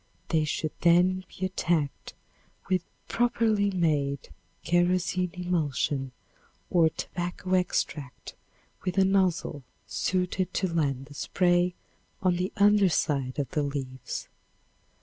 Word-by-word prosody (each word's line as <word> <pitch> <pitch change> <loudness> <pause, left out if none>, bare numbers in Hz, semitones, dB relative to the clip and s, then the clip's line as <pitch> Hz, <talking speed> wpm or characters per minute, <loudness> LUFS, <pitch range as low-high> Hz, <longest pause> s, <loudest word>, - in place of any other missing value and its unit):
They 155 -2 +2
should 155 +1 -2
then 180 +2 +4
be 190 - -1
attacked 170 -6 -1 0.5
with 185 -2 +2 0.3
properly 225 -4 +2
made 150 -7 0 0.3
kerosene 180 +1 +2
emulsion 150 -6 -1 0.6
or 165 -3 +5
tobacco 175 +3 -4
extract 160 -6 -1 0.5
with 185 0 -2
a 190 - +6
nozzle 190 -6 +1 0.2
suited 185 0 -1
to 185 -3 0
land 140 -5 0
the 145 - -13
spray 175 +3 +2 0.4
on 180 -2 +2
the 180 +1 -1
under 205 -1 +5
side 140 -6 0
of 140 -2 -2
the 155 -4 0
leaves. 135 -3 -4
175 Hz, 110 wpm, -28 LUFS, 150-185 Hz, 0.6 s, a